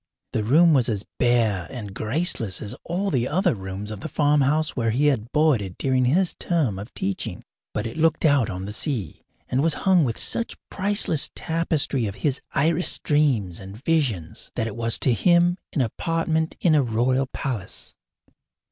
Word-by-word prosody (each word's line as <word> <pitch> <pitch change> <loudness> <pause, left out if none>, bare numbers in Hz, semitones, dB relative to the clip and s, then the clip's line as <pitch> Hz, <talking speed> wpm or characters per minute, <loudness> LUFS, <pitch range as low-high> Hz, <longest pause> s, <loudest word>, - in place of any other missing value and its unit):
The 110 - 0
room 160 +9 +5
was 130 -5 +3
as 105 -3 -2
bare 115 -7 +2
and 105 -7 -7
graceless 115 - 0
as 105 - -5
all 190 +4 -1
the 125 -4 +1
other 180 +5 +1
rooms 95 0 -6
of 105 - -6
the - - -6
farmhouse 150 +1 +2
where 115 -3 0
he 130 +7 +1
had 125 -5 +1
boarded 130 - +1
during 130 -2 +1
his 170 +8 +2
term 145 - 0
of 105 +4 -9
teaching; 95 0 -3 0.3
but 105 - -3
it 115 - -6
looked 160 +1 +2
out 140 -6 +3
on 95 -1 -5
the 105 - -6
sea, 125 - -1 0.3
and 130 - 0
was 160 0 +1
hung 185 -4 +5
with 115 -5 -1
such 235 - -2
priceless 200 -6 +3
tapestry 160 -7 0
of 100 - -5
his 140 -3 0
iris 165 +5 +2
dreams 130 - +1
and 95 +1 -10
visions 125 - -1
that 115 - -1
it 115 - -5
was 115 0 -1
to 130 - +2
him 175 +5 +3
an 145 - +1
apartment 160 +6 -1
in 170 - +4
a 150 - +5
royal 130 +2 +1
palace. 120 -8 -5
130 Hz, 175 wpm, -24 LUFS, 110-160 Hz, 0.3 s, room